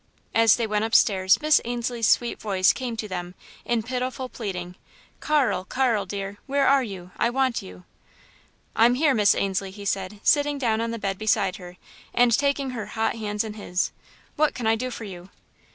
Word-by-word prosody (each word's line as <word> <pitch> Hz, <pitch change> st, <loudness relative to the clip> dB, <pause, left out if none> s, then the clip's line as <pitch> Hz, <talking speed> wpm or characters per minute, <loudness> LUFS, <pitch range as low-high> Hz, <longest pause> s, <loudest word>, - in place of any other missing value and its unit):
As 225 Hz, -1 st, +5 dB
they 235 Hz, -, -1 dB
went 210 Hz, -1 st, 0 dB
upstairs 195 Hz, -4 st, +4 dB
Miss 305 Hz, -1 st, +4 dB
Ainslie's 240 Hz, -1 st, -1 dB
sweet 240 Hz, -1 st, +1 dB
voice 190 Hz, -3 st, +3 dB
came 245 Hz, -3 st, -5 dB
to 220 Hz, -, -4 dB
them 180 Hz, -1 st, -6 dB, 0.3 s
in 235 Hz, -2 st, 0 dB
pitiful 255 Hz, +1 st, -3 dB
pleading: 180 Hz, -7 st, -5 dB, 0.5 s
"Carl, 290 Hz, -10 st, +1 dB
Carl, 225 Hz, -2 st, 0 dB
dear! 200 Hz, +1 st, -5 dB
Where 280 Hz, 0 st, +2 dB
are 275 Hz, 0 st, +5 dB
you? 190 Hz, -6 st, -7 dB
I -, -, +2 dB
want 260 Hz, -1 st, 0 dB
you!" 90 Hz, -1 st, -12 dB, 0.9 s
"I'm 235 Hz, +2 st, +5 dB
here, 290 Hz, +1 st, +3 dB
Miss 210 Hz, -4 st, +4 dB
Ainslie," 195 Hz, 0 st, -1 dB
he 200 Hz, +1 st, -10 dB
said, 195 Hz, +1 st, -2 dB
sitting 290 Hz, -1 st, +3 dB
down 225 Hz, -4 st, 0 dB
on 230 Hz, -, -2 dB
the 230 Hz, -, -3 dB
bed 195 Hz, -3 st, -3 dB
beside 200 Hz, -2 st, +1 dB
her 180 Hz, -2 st, -11 dB, 0.4 s
and 240 Hz, -2 st, +5 dB
taking 280 Hz, -1 st, 0 dB
her 225 Hz, -4 st, -5 dB
hot 225 Hz, +1 st, -1 dB
hands 210 Hz, -1 st, -2 dB
in 220 Hz, -1 st, -6 dB
his. 185 Hz, -3 st, -2 dB, 0.5 s
"What 305 Hz, 0 st, +2 dB
can 245 Hz, -, -4 dB
I 220 Hz, 0 st, +4 dB
do 255 Hz, +3 st, -3 dB
for 235 Hz, -, -7 dB
you?" 185 Hz, -3 st, -9 dB
220 Hz, 185 wpm, -24 LUFS, 195-250 Hz, 0.9 s, As